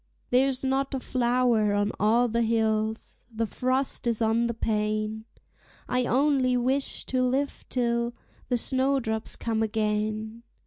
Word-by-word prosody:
There's 260 +1 +3
not 270 +1 0
a - - -2
flower 240 -4 +1
on 205 0 +1
all 230 +4 +3
the 235 0 0
hills, 220 -1 -1
the 225 0 -1
frost 255 +3 -1
is 230 -2 +1
on 230 +1 +2
the 235 - -2
pane; 215 0 -1 0.6
I 250 0 0
only 265 -2 +2
wish 265 +3 -1
to 255 -1 0
live 265 +3 -1
till 235 -1 0 0.3
the 245 - +2
snowdrops 260 -3 0
come 225 -1 -2
again. 215 +1 -1
235 Hz, 135 wpm, -27 LUFS, 220-255 Hz, 0.6 s, There's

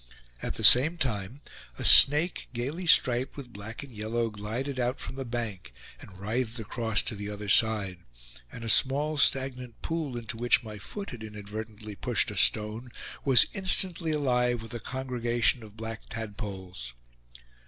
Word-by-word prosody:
At - - -4
the - - -6
same 150 +8 +8
time 125 - -3 0.4
a - - -6
snake, 150 +5 +6
gayly 140 +9 -4
striped 125 -4 +3
with 125 -4 -10
black 110 +6 -8
and 135 -3 -12
yellow, 115 +2 -3
glided 115 +6 -5
out 125 +1 -1
from - - -8
the 135 - -5
bank, 115 - -6 0.3
and 95 - -14
writhed 115 +4 -3
across 110 -1 -1
to - - -2
the 105 0 -6
other 105 0 -7
side; 100 -3 +3 0.5
and 115 - -9
a - - -5
small 145 +6 +3
stagnant 130 -3 0
pool 155 -6 -4
into 115 -1 -6
which 120 +1 +3
my 105 -2 -9
foot 200 - -7
had 120 -3 -9
inadvertently 105 0 -8
pushed - - 0
a - - -8
stone 110 +3 +1 0.3
was 125 -6 +6
instantly 185 -3 -1
alive 125 -5 0
with 115 - -10
a 120 - -5
congregation 120 -1 -1
of 110 -1 -14
black 115 0 -7
tadpoles. 100 - -7
120 Hz, 160 wpm, -27 LUFS, 105-130 Hz, 0.5 s, same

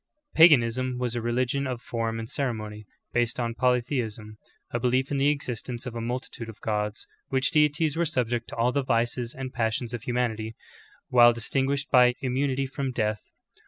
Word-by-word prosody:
Paganism^ 130 -5 +5
was 125 -1 -2
a 120 - -1
re 120 +1 -1
ligion 130 +3 0
of 125 - -4
form 115 -1 -3
and 115 0 -5
ceremony, 110 -6 -4 0.3
based 120 0 0
on 115 -1 -1
polytheism 120 -3 -1 0.2
— - - -42
a 120 - 0
be 125 - +1
lief 130 +2 +1
in 140 - 0
the 135 +1 +3
existence 125 -4 -2
of 125 - -5
a 115 - -4
multitude 120 -1 -5
of 110 - -11
gods, 105 0 -2 0.2
which 130 0 +1
deities 150 0 +2
were 170 - +1
subject 120 -6 -1
to - - -7
all 115 +2 +2
the 140 - +1
vices 120 -1 -1
and 130 -1 -6
passions 115 +1 -1
of 120 - -4
humanity, 115 -2 -2 0.5
while 120 -1 +7
distinguished 135 +4 -1
by 125 -1 +6
immunity 135 +1 0
from 135 0 -3
death. 110 -3 -1
125 Hz, 185 wpm, -26 LUFS, 115-130 Hz, 0.5 s, while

